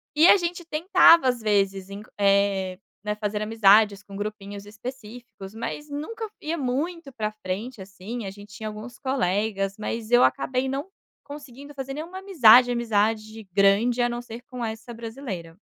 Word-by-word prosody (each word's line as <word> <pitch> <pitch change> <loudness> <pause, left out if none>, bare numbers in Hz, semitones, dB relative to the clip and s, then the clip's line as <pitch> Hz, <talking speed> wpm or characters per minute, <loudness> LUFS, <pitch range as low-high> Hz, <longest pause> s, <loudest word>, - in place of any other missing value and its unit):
E 315 +3 +6
a - - +8
gente 345 -1 -4
tentava 335 -2 +5
às 250 -1 +1
vezes 195 -3 0
enc 200 +2 -9
eh, 195 -2 +2 0.2
né, 210 0 -2
fazer 210 0 -3
amizades 210 -1 +4
com 200 - -12
grupinhos 205 -1 -6
específicos, 220 -2 -10
mas 295 +6 -6
nunca 440 +11 -5
ia 320 +2 -3
muito 285 +3 -3
para 215 -2 -3
frente, 215 +3 -6
assim, 200 +4 -7
a 195 - -5
gente 205 +1 -14
tinha 220 -2 -6
alguns 215 +3 -9
colegas, 200 -6 -1
mas 220 +1 -5
eu 245 +1 +6
acabei 260 -1 +1
não 275 +5 -3 0.4
conseguindo 285 -1 -11
fazer 270 0 -5
nenhuma 330 +6 -7
amizade, 250 - +6
amizade 220 -2 -1
grande 205 +6 +3
a 240 - +2
não 240 0 -4
ser 235 0 -9
com 250 -2 -4
essa 225 +2 -6
brasileira. 225 -8 -7
225 Hz, 160 wpm, -25 LUFS, 205-265 Hz, 0.4 s, a